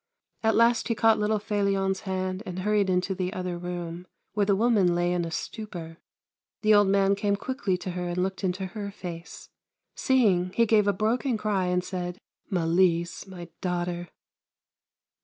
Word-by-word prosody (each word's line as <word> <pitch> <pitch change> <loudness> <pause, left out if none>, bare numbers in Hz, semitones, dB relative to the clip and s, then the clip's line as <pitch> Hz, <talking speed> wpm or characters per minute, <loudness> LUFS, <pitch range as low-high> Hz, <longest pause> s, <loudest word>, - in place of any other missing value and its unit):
At 220 -1 +2
last 230 +1 +4
he 230 - 0
caught 225 0 +4
little 210 +1 +1
Felion's 200 -2 0
hand 185 -1 -3
and 180 -1 -5
hurried 205 -1 +2
into 185 +1 +1
the 185 -1 -2
other 180 -3 -3
room, 175 0 -5 0.3
where 205 -1 +1
the 200 - +4
woman 205 -5 +3
lay 175 0 +1
in 175 -1 0
a - - -4
stupor. 170 -3 -6 0.7
The 215 0 +5
old 205 -1 +6
man 195 0 +3
came 200 0 +1
quickly 205 -4 -2
to 180 +1 -5
her 180 0 -3
and 175 0 -3
looked 190 +1 -1
into 185 +1 -1
her 200 +1 -5
face. 175 -4 -8 0.4
Seeing, 195 -9 +2
he 230 - +4
gave 210 -2 +3
a - - +5
broken 225 +5 0
cry 205 -4 0
and 180 0 +1
said: 180 -1 -4 0.2
" - - -44
Malise, 170 0 +1
my 175 -3 -9
daughter 175 -1 -2
190 Hz, 175 wpm, -27 LUFS, 180-210 Hz, 0.7 s, old